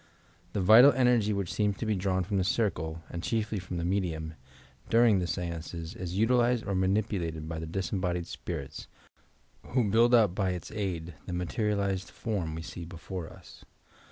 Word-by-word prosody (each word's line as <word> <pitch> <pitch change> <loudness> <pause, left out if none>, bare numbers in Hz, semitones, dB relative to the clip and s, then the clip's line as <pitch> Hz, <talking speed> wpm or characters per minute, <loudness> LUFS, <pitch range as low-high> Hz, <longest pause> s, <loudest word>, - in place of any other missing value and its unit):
The 100 - 0
vital 115 +9 +9
enei^ 120 -4 +3
which 100 -4 -2
seems 105 -2 0
to - - -3
be 110 -1 +1
drawn 95 -1 0
from 100 +3 -2
the - - +2
circle, 80 -6 -1
and 85 - -4
chiefly 110 0 -1
from 90 -1 -6
the 85 - -2
medium, 85 -4 -1 0.6
during 115 -3 +5
the 90 - -1
stances, 85 0 -4
is 90 0 -5
utilized 120 +1 +3
or 100 - -2
manipulated 95 -4 0
by 80 0 -4
the 80 - -5
disembodied 90 0 -2
spirits, 75 -4 -6 0.8
who 125 -1 +1
buUd 120 +3 +5
up 105 -6 +4
by 95 -2 0
its 90 - -7
aid 90 -5 -3
the 90 - -4
materialized 100 +1 -1
form 95 -9 -3
we 80 - -5
see 85 - -7
before 85 +1 -7
us. - - -15
95 Hz, 170 wpm, -29 LUFS, 85-105 Hz, 0.8 s, vital